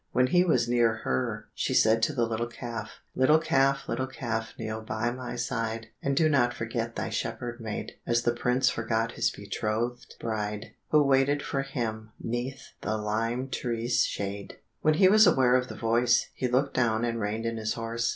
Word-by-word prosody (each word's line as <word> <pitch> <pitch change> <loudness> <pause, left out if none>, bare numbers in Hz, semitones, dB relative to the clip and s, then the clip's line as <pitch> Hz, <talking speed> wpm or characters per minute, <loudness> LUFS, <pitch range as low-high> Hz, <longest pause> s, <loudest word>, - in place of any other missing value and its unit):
When 125 - +4
he 175 +7 +4
was 125 -10 +2
near 120 -2 +3
her 65 0 -2
she - - -1
said 110 +1 +4
to 135 +7 +2
the 120 -4 +1
little 115 +1 -2
calf, 115 -2 -7
"Little 140 +4 +5
calf, 135 -3 +2
little 130 +3 -1
calf, 115 -4 -4
kneel 110 -1 -4
by 110 +2 -2
my 125 0 -6
side, 115 -2 -3
And 140 0 -1
do 160 - +5
not 130 -5 +2
forget 115 0 -3
thy - - -2
shepherd 120 0 -4
maid, 110 -2 -4 0.2
As 120 0 +2
the 120 - +2
prince 125 +2 +1
forgot 115 0 0
his - - +1
betrothed 110 +4 -3
bride, 105 -1 -3 0.2
Who 150 -1 +5
waited 140 +1 +3
for 135 - -1
him 110 -5 -4
'neath 120 +3 -4
the 110 0 -1
lime 115 +5 -1
tree's 120 -1 0
shade." 100 0 -4 0.2
When 155 0 +3
he 185 +4 +6
was 215 +1 +7
aware 130 -2 +4
of 125 0 +3
the - - -8
voice, 120 +1 +2
he 130 - -1
looked 130 +3 +1
down 115 -2 +1
and 115 -1 -2
reined 110 +2 -2
in 115 0 -2
his 110 0 -2
horse. 115 0 -2
120 Hz, 190 wpm, -28 LUFS, 110-130 Hz, 0.2 s, was